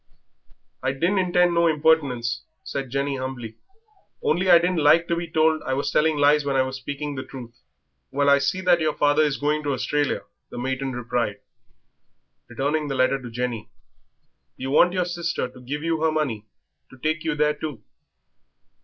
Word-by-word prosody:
"I 130 - 0
didn't 175 +8 +1
intend 180 -1 +3
no 170 0 +3
impertinence," 145 -7 +1 0.2
said 135 -3 -4
Jenny 140 +1 -1
humbly, 125 -4 -6 0.7
"only 185 +4 +1
I 175 - +9
didn't 175 -1 +1
like 165 +3 +5
to 170 - +1
be 170 0 -4
told 160 -1 +2
I 130 - -2
was 140 +1 -1
telling 155 0 +2
lies 145 +1 +4
when 140 -1 -1
I 130 - +4
was 130 0 -4
speaking 145 +3 -5
the 130 - -4
truth." 120 -3 -10 0.6
"Well, 140 0 0
I 140 0 +6
see 185 +6 -1
that 180 -2 +4
your 155 -1 0
father 145 +1 +3
is 150 -2 +1
going 150 +1 0
to 145 -2 -1
Australia," 145 +2 -1 0.3
the - - -9
matron 130 +1 -2
replied, 120 -3 -2 1.1
returning 150 +2 -1
the 135 - -3
letter 130 +1 +2
to 125 - -8
Jenny; 120 -1 -4 0.9
"you 135 +1 -4
want 175 +4 +5
your 180 -1 0
sister 170 -6 -2
to 125 - -15
give 145 +4 -5
you 165 -1 -1
her 160 0 +2
money 130 -9 -2 0.4
to 130 - -15
take 155 +4 -1
you 160 -2 -1
there 150 0 +2
too." 150 -5 -7
145 Hz, 180 wpm, -24 LUFS, 130-160 Hz, 1.1 s, I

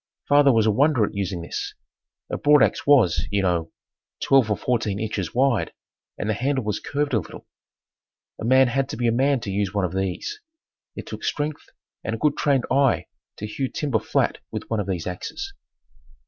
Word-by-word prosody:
Father 145 -1 +6
was 115 -3 +3
a 110 - +4
wonder 130 0 +3
at - - -7
using 95 -3 -3
this. 85 - -5 0.6
A - - 0
broadax 150 -2 +3
was, 130 -12 +4
you 100 -1 0
know, 85 -3 0 0.5
twelve 135 -5 +4
or 105 - +1
fourteen 110 -5 -1
inches 105 -5 -3
wide 130 -3 +2 0.4
and - - -3
the 110 - +1
handle 130 +4 -1
was 105 -1 -2
curved 145 -1 -2
a 110 - +4
little. 85 - -10 0.9
A - - -6
man 130 +3 +5
had 135 +2 0
to - - -5
be 120 0 +1
a - - +3
man 135 +2 +2
to 100 - -4
use 100 0 -1
one 100 -2 +2
of 90 - -4
these. 95 - -3 0.5
It - - -7
took - - -8
strength 150 0 -2 0.4
and 115 - -2
a - - -5
good 150 +4 +1
trained 140 -3 +1
eye 135 -1 +3 0.3
to 105 - -5
hew 130 +5 -3
timber 140 -7 -1
flat - - 0
with - - -6
one 110 - +1
of 100 - -2
these 90 -4 -2
axes. 245 - -5
115 Hz, 195 wpm, -24 LUFS, 100-140 Hz, 0.9 s, Father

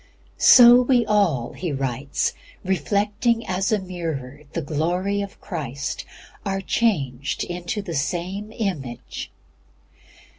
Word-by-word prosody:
"So 245 0 +9
we 245 -2 +3
all," 195 - +1
he 175 -4 -4
writes, 135 0 -1 0.3
"reflecting 205 - 0
as 190 +3 -1
a 215 - +4
mirror 160 -8 -5
the 165 - -1
glory 175 +7 -1
of 200 -1 -7
Christ, 140 - -4 0.4
are 195 -1 -1
changed 145 - 0
into 175 +4 -4
the 175 -4 -5
same 180 +8 -2
image." 160 - -4
180 Hz, 110 wpm, -23 LUFS, 145-205 Hz, 0.4 s, So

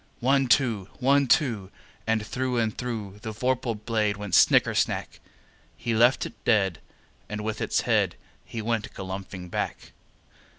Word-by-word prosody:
One, 135 +2 +3
two! 115 -6 +2
One, 140 +1 +3
two! 120 -10 +2 0.4
And 110 -1 +1
through 130 +2 -2
and 110 -2 0
through 110 -5 -5
The 110 - -5
vorpal 125 +1 -1
blade 105 -1 -1
went 105 -3 -6
snicker - - +5
snack! - - -1 0.6
He 115 - -2
left 120 +3 +4
it 110 -4 -10
dead, 95 -7 +2 0.5
and 105 0 -4
with 110 0 -3
its - - +1
head - - +1 0.3
He 115 -2 -6
went 115 -1 -1
galumphing 95 -1 -6
back. - - -3
110 Hz, 145 wpm, -26 LUFS, 105-125 Hz, 0.6 s, snicker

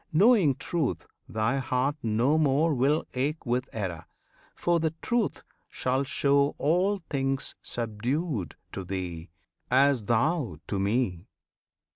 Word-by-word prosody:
Knowing 185 - +5
Truth, 140 - -2 0.2
thy 110 +4 0
heart 130 +2 0
no 115 +6 +2
more 150 +2 +3
Will 140 +4 +2
ache 145 +5 -2
with 125 +2 -1
error, 90 -7 -4 0.5
for 175 -1 +1
the 160 0 -1
Truth 235 -3 -1 0.3
shall 130 +2 0
show 140 +1 +2
All 185 +5 +1
things 135 -1 -1
subdued 120 - -2 0.2
to 95 - -5
thee, 90 -2 -5 0.4
as 130 -3 +4
thou 120 - +1
to 100 - -2
Me. 100 -3 0
135 Hz, 120 wpm, -28 LUFS, 110-155 Hz, 0.5 s, Knowing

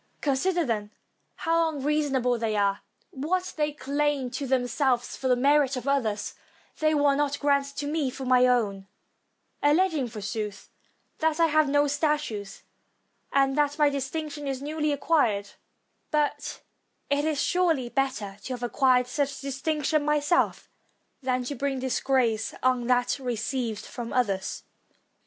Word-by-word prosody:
Consider, 335 +5 +1
then, 210 -4 -2 0.5
how 330 0 +1
unreasonable 280 -4 0
they 220 -2 -1
are; 200 -1 +1 0.3
what 360 +7 -2
they 300 -1 0
claim 285 -2 -1
to 265 +2 -4
themselves 250 0 +1
for 265 - -3
the 250 - +4
merit 275 +1 +3
of 255 - -6
others, 225 -7 0 0.5
they 310 0 +3
will 285 -1 +3
not 285 0 0
grant 280 -1 +2
to 290 - -3
me 295 -2 0
for 265 +1 -7
my 255 0 +5
own; 205 -6 +1 0.7
alleging, 305 -2 +3
forsooth, 210 -2 -5 0.5
that 320 0 +1
I 335 - +6
have 310 -2 +3
no 290 +1 +3
statues, 290 -9 -1 0.7
and 270 -1 +3
that 290 0 +1
my 295 -2 +4
distinction 290 +2 -4
is 270 -1 -2
newly 300 +2 -1
acquired; 255 -9 +1 0.6
but 300 -1 -1 0.5
it 285 0 +2
is 310 -2 0
surely 330 -8 +1
better 240 -7 -2
to 260 - -3
have 245 -1 -6
acquired 250 +1 +3
such 280 +2 -2
distinction 295 +2 0
myself 300 +3 +1 0.5
than 255 -1 0
to 245 - -4
bring 275 0 -2
disgrace 255 -4 0
on 255 -2 +2
that 250 +2 +2
re 250 -3 -2
ceived 230 -1 -3
from 240 -2 -6
others. 200 -7 -1
275 Hz, 145 wpm, -27 LUFS, 245-295 Hz, 0.7 s, I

